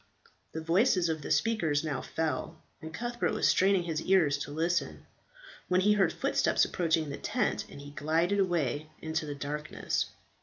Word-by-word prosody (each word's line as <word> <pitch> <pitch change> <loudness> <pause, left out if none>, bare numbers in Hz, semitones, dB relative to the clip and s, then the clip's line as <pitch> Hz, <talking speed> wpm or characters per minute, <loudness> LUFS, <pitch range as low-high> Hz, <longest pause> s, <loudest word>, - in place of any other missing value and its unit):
The 160 - -4
voices 180 +2 +3
of 160 -1 -2
the - - -6
speakers 160 -3 +1
now 145 -5 -2
fell, 160 +2 -3 0.2
and 160 - -7
Cuthbert 240 +7 -2
was - - +2
straining 190 -1 +3
his 165 -2 -2
ear 190 -4 +4
to 145 0 -2
listen, 170 +3 -1 0.6
when 180 0 +3
he 210 +2 +4
heard 200 -2 +3
footsteps - - +2
approaching 160 -3 0
the - - -5
tent, - - -1
and - - -10
he 145 0 -10
glided 165 +7 +1
away 155 -6 0
into 160 -1 -3
the 145 - -4
darkness. 150 +2 -3
160 Hz, 165 wpm, -30 LUFS, 150-185 Hz, 0.6 s, ear